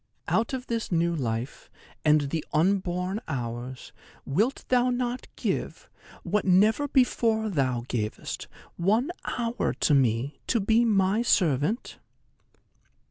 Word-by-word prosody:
Out 225 +3 +1
of 260 -1 -4
this 230 -4 -3
new 170 0 +1
life, 120 -3 -4 0.3
and 150 -2 +3
the 160 -2 -1
unborn 185 +3 +1
hours, 120 0 -5 0.3
wilt 215 - 0
thou 250 0 +3
not 245 0 -2
give, - - -3 0.3
what 205 +4 0
never 210 +9 +4
before 230 -5 +2
thou 130 -7 0
gavest, 110 -4 -4 0.3
one 220 - +2 0.3
hour 235 0 -1
to 150 - +2
me, 135 +1 +1
to 235 - +2
be 220 +3 +3
my 205 -1 +2
servant?" 175 - +1
190 Hz, 120 wpm, -27 LUFS, 140-230 Hz, 0.3 s, never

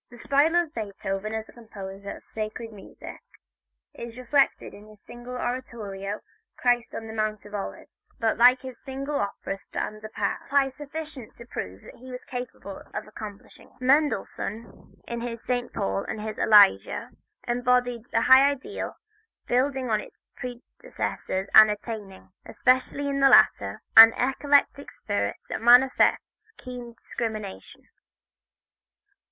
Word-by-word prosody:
The 245 - -13
style 285 +7 +2
of 345 -3 +1
Beethoven 205 -1 -4
as 220 0 -4
a - - -16
composer 200 -4 -9
of - - -18
sacred 220 +1 -5
music 200 - -11 0.7
is 235 0 -9
reflected 265 +2 +1
in 210 +1 -13
his 215 -1 -16
single 240 +3 -10
oratorio 215 -6 -5 0.4
"Christ 245 -1 +1
on 225 - -5
the 220 - -8
Mount 215 -1 -2
of 205 - -13
Olives," 200 -1 -7
that 225 -3 +1
like 250 +2 +6
his 260 -2 -9
single 275 +1 -4
opera 200 -2 -3
stands 215 +2 -6
apart, 215 +4 -4
amply 275 -1 +3
sufficient 295 -3 -8
to 235 - -12
prove 95 - -7
what - - -12
he 260 - -11
was 250 0 -8
capable 245 -5 -7
of - - -4
accomplishing. 215 -1 -11
Mendelssohn, 255 -4 -1
in 235 0 -4
his 235 -1 -6
"St. 245 -1 -2
Paul" 95 0 -2
and - - -5
his 215 0 -5
"Elijah," 205 - +5 0.4
embodied 245 -1 +1
a 225 - +2
high 265 +3 +7
ideal, 285 +9 -5 0.5
building 255 0 0
on 215 - +2
his - - -13
predecessors 245 - -5
and 215 0 +9
attaining, 210 -3 -7
especially 260 +3 +1
in 275 0 -1
the 275 0 +6
latter, - - +4
an 225 0 +11
eclectic 280 +2 +1
spirit - - -3
that - - -4
manifests 260 - +4
keen 245 -2 -9
discrimination. 220 -4 -6
235 Hz, 140 wpm, -26 LUFS, 215-260 Hz, 0.7 s, an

